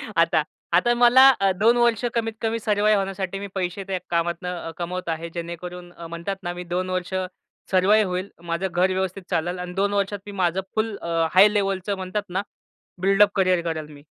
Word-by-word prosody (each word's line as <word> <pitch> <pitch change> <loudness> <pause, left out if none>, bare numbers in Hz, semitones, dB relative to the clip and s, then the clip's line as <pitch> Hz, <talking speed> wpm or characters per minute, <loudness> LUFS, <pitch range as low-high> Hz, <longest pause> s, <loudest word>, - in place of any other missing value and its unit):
आता. 165 -2 +3 0.3
आता 240 +8 +4
मला 245 +2 +7
अ, 195 -1 +3
2 230 +3 +4
वर्ष 235 -2 +2
कमीत 225 -1 -1
कमी 225 0 -1
सर्वाइव 210 -1 +2
होण्यासाठी 195 -1 -3
मी 200 - -5
पैसे 185 +1 -2
त्या 190 -1 -2
कामातनं 170 +1 -1
अ, - - -5
कमवत 180 0 -4
आहे. 165 +1 -3
जेणेकरून 175 +1 -7
अ, 170 -1 -9
म्हणतात 170 +4 -4
ना, 175 -1 -3
मी 180 0 -6
2 180 +1 -2
वर्ष 185 0 -3 0.6
सर्वाइव 200 +3 +4
होईल. 180 +2 -3
माझं 170 +2 -2
घर 180 +2 +2
व्यवस्थित 190 0 -2
चालेल 175 +3 -1
आणि 180 0 -6
2 200 +2 0
वर्षात 200 0 -1
मी 205 - -7
माझं 180 +2 +1
फुल 220 -1 0
अ, - - -8 0.2
हाय 190 +3 +8
लेव्हलचं 195 -1 0
म्हणतात 190 +2 -3
ना, 185 +2 -1 0.6
बिल्डअप 195 +2 +5
करिअर 185 -3 +3
करेन 160 -2 -4
मी. 145 0 -15
185 Hz, 190 wpm, -23 LUFS, 175-205 Hz, 0.6 s, हाय